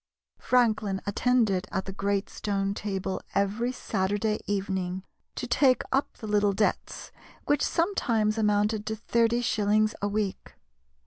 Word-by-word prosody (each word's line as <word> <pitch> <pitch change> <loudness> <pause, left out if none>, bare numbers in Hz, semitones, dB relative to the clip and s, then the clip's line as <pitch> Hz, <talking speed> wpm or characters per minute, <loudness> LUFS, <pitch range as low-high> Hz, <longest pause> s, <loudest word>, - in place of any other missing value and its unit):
Franklin 215 -6 +2
attended 210 -3 +1
at 190 - -2
the 195 - -5
great 200 0 -1
stone 195 -1 -2
table 195 -2 -3
every 205 +5 +1
Saturday 205 -2 -1
evening 190 -2 -2 0.3
to - - -3
take 260 -3 +3
up 270 +2 0
the - - -8
little 205 -1 +2
debts, 210 +2 -1 0.3
which 290 -1 +2
sometimes 235 - +1
amounted 210 0 +1
to 220 - -1
thirty 230 +2 +1
shillings 215 -1 +2
a 205 - +1
week. 205 -1 -3
210 Hz, 130 wpm, -27 LUFS, 200-225 Hz, 0.3 s, take